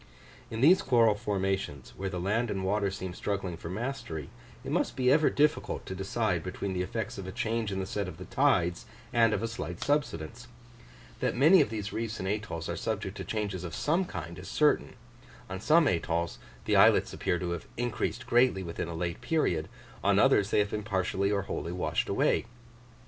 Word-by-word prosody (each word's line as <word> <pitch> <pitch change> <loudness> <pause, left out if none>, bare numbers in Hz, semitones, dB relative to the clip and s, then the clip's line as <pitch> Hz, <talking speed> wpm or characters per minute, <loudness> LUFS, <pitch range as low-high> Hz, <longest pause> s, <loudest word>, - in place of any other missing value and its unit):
In 110 0 -4
these 180 +7 +7
coral 115 - +4
formations, 95 -8 -2
where 95 0 -3
the 90 -1 -4
land 110 +6 0
and 95 -2 -2
water 100 +1 +1
seem 95 -2 -5
struggling 95 -2 -3
for 85 - -8
mastery, 95 - -4 0.3
it - - -5
must - - 0
be 130 -1 +3
ever 150 +2 +5
difficult 150 +1 +1
to - - -5
decide 95 -1 -1
between 95 +2 -4
the 90 - -1
effects 100 +2 -3
of 95 - -6
a - - -4
change 110 +1 -1
in 95 - -2
the 95 - -2
set 100 0 -3
of 90 - -8
the - - -8
tides 85 +1 +1 0.3
and 115 -2 +5
of 105 0 -1
a - - 0
slight 85 -7 -5
subsidence: 120 - -1 0.7
that - - -1
many 160 +7 +7
of 140 - +1
these 105 -2 -4
reefs 115 -1 -3
and 95 - -3
atolls 95 -6 -3
are - - -2
subject - - -3
to - - -4
changes 100 -4 -3
of 85 - -5
some 170 +5 +1
kind 85 - -7
is 95 - -9
certain; 150 +8 +2 0.6
on 95 0 -4
some 160 +5 +5
atolls 85 -1 -1 0.3
the - - +2
islets - - +5
appear 90 - 0
to 85 0 -3
have 85 -2 -5
increased 120 -2 -2
greatly 120 -5 +3
within 85 -1 -4
a 85 - -5
late 85 0 -3
period; 90 - 0 0.3
on - - +4
others 100 - +4
they - - +1
have 105 -1 +2
been 105 - -2
partially 100 -1 0
or 100 -1 +1
wholly 85 - -4
washed 90 0 -1
away. - - +2
100 Hz, 200 wpm, -29 LUFS, 90-115 Hz, 0.7 s, these